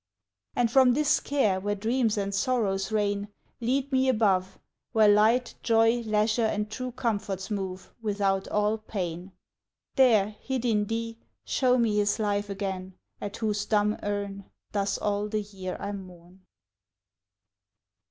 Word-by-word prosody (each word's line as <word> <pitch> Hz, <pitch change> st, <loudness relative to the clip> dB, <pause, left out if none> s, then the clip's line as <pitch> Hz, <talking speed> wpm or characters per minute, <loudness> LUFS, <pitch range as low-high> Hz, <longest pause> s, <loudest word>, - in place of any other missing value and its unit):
And 235 Hz, -2 st, +2 dB
from 255 Hz, -1 st, +5 dB
this 300 Hz, 0 st, +3 dB
care, 220 Hz, -10 st, +1 dB
where 205 Hz, +2 st, -1 dB
dreams 225 Hz, +1 st, 0 dB
and 200 Hz, 0 st, -2 dB
sorrows 200 Hz, -4 st, 0 dB
reign, 205 Hz, -1 st, 0 dB, 0.3 s
Lead 260 Hz, +4 st, 0 dB
me 260 Hz, 0 st, +3 dB
above, 195 Hz, -6 st, +2 dB, 0.4 s
Where 220 Hz, -2 st, +5 dB
light, 220 Hz, +4 st, +4 dB
joy, 225 Hz, 0 st, +4 dB
leisure, 220 Hz, 0 st, +1 dB
and 210 Hz, 0 st, -2 dB
true 255 Hz, +2 st, -4 dB
comforts 210 Hz, -5 st, -3 dB
move 190 Hz, -2 st, -4 dB
Without 200 Hz, -3 st, 0 dB
all 210 Hz, +1 st, +1 dB
pain: 185 Hz, -3 st, -5 dB, 0.7 s
There, 220 Hz, -6 st, +5 dB
hid 260 Hz, -2 st, -3 dB
in 210 Hz, -3 st, +2 dB
thee, 230 Hz, +1 st, -3 dB, 0.3 s
show 255 Hz, -1 st, +2 dB
me 225 Hz, -3 st, +2 dB
his 205 Hz, 0 st, +2 dB
life 205 Hz, -1 st, -1 dB
again 190 Hz, -2 st, -4 dB, 0.3 s
At 205 Hz, 0 st, -5 dB
whose 210 Hz, -2 st, -1 dB
dumb 210 Hz, 0 st, +2 dB
urn 200 Hz, -1 st, -3 dB, 0.3 s
Thus 200 Hz, -1 st, 0 dB
all 205 Hz, 0 st, -1 dB
the 215 Hz, 0 st, -1 dB
year 190 Hz, -2 st, -6 dB
I 200 Hz, -, -4 dB
mourn. 185 Hz, -1 st, -11 dB
210 Hz, 140 wpm, -27 LUFS, 200-230 Hz, 0.7 s, from